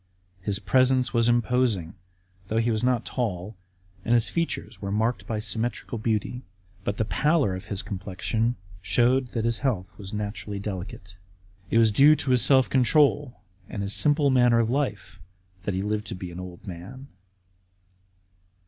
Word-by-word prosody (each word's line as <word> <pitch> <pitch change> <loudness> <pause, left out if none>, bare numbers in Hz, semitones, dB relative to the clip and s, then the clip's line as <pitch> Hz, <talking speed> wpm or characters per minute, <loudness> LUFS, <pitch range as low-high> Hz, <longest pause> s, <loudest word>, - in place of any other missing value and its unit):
His 100 +1 0
presence 130 +1 +2
was 115 -1 +3
imposing, 120 -7 +1 0.5
though 110 - -1
he 115 +1 +2
was 110 0 -1
not 125 -2 +1
tall, 105 -4 -3 0.5
and 115 - +2
his 115 -1 +3
features 165 -1 -3
were 100 -1 -3
marked 110 +4 0
by 110 - -2
symmetrical 110 +2 -3
beauty; 110 +2 -1 0.4
but 100 - -2
the 110 - 0
pallor 150 - +2
of 95 - -8
his 100 -2 -4
complexion 100 +5 -2 0.3
showed 125 +5 +2
that 115 -1 -1
his 115 -1 0
health 110 -10 -2
was 95 -1 -7
naturally 105 -1 -4
delicate. 95 -2 -7 0.5
It - - +2
was 115 -1 +5
due 140 +8 +7
to 135 - -1
his 125 -1 +4
self 130 +2 +5
control 135 - +2 0.3
and 100 - -4
his 100 +1 -1
simple 145 -2 +3
manner 125 -2 +4
of 115 0 +2
life 105 -9 -2 0.5
that 100 - -1
he 95 - -1
lived 105 +1 -2
to - - -4
be 90 -1 -7
an 85 - -8
old 90 -1 -9
man. 100 +10 -9
115 Hz, 165 wpm, -26 LUFS, 100-125 Hz, 0.5 s, due